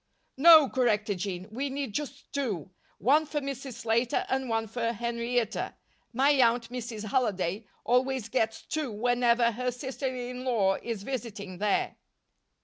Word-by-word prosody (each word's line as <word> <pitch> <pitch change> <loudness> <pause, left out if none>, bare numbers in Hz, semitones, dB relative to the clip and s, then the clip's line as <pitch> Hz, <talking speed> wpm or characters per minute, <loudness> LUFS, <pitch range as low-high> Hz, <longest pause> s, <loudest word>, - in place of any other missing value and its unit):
"No," 315 0 +9
corrected 215 -6 +1
Jean, 185 -1 -4
"we 270 +5 -2
need 270 -4 -4
just 285 0 -5
two. 215 - -2 0.3
One 295 - +3
for 295 0 -1
Mrs. 275 -2 -5
Slater 230 +1 +1
and 265 -1 -1
one 225 0 0
for 230 +1 -2
Henrietta. 235 0 -2 0.4
My 270 +4 +3
aunt, 240 -4 +3
Mrs. 225 -4 -5
Halliday, 205 -4 0 0.2
always 255 -1 +1
gets 225 -2 -1
two 305 -5 -3
whenever 240 +1 +2
her 250 +3 -2
sister 260 +2 -4
in 250 0 -5
law 205 -7 +2
is 225 -4 -4
visiting 210 -7 -5
there." 210 -1 0
240 Hz, 140 wpm, -28 LUFS, 220-265 Hz, 0.4 s, No